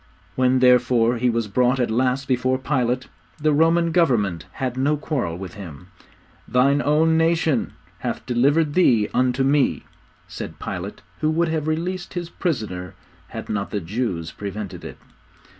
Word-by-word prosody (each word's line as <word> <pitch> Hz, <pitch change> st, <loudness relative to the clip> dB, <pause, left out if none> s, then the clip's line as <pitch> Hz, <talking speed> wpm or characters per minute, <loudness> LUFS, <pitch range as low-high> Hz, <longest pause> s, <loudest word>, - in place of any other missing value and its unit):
When, 130 Hz, 0 st, +2 dB
therefore, 125 Hz, -1 st, +4 dB
He 125 Hz, +1 st, +2 dB
was 115 Hz, -2 st, -1 dB
brought 125 Hz, +5 st, +2 dB
at 120 Hz, -3 st, 0 dB
last 130 Hz, +3 st, 0 dB
before 130 Hz, 0 st, +1 dB
Pilate, 130 Hz, -2 st, -1 dB, 0.3 s
the 155 Hz, 0 st, +2 dB
Roman 165 Hz, +2 st, +3 dB
Government 115 Hz, -, +1 dB
had 130 Hz, -2 st, -3 dB
no 140 Hz, +4 st, +1 dB
quarrel 130 Hz, -, -2 dB
with 95 Hz, -1 st, -7 dB
Him. 90 Hz, -3 st, -10 dB, 0.6 s
'Thine 140 Hz, +3 st, +3 dB
own 160 Hz, +3 st, +3 dB
nation... 165 Hz, -5 st, +1 dB, 0.3 s
hath -, -, -4 dB
delivered 140 Hz, +5 st, +2 dB
Thee 120 Hz, -, +3 dB
unto 125 Hz, +1 st, +2 dB
me,' 140 Hz, +1 st, +2 dB, 0.4 s
said -, -, -7 dB
Pilate -, -, -6 dB, 0.2 s
who 155 Hz, -, +1 dB
would 165 Hz, +1 st, +1 dB
have 155 Hz, -1 st, -2 dB
released 175 Hz, +4 st, -3 dB
his 175 Hz, -1 st, -4 dB
prisoner, 105 Hz, -, -3 dB, 0.3 s
had -, -, -7 dB
not 100 Hz, -1 st, -2 dB
the 105 Hz, -, -2 dB
Jews 90 Hz, -3 st, -3 dB
prevented 100 Hz, -1 st, -6 dB
it. -, -, -8 dB
130 Hz, 150 wpm, -22 LUFS, 115-155 Hz, 0.6 s, therefore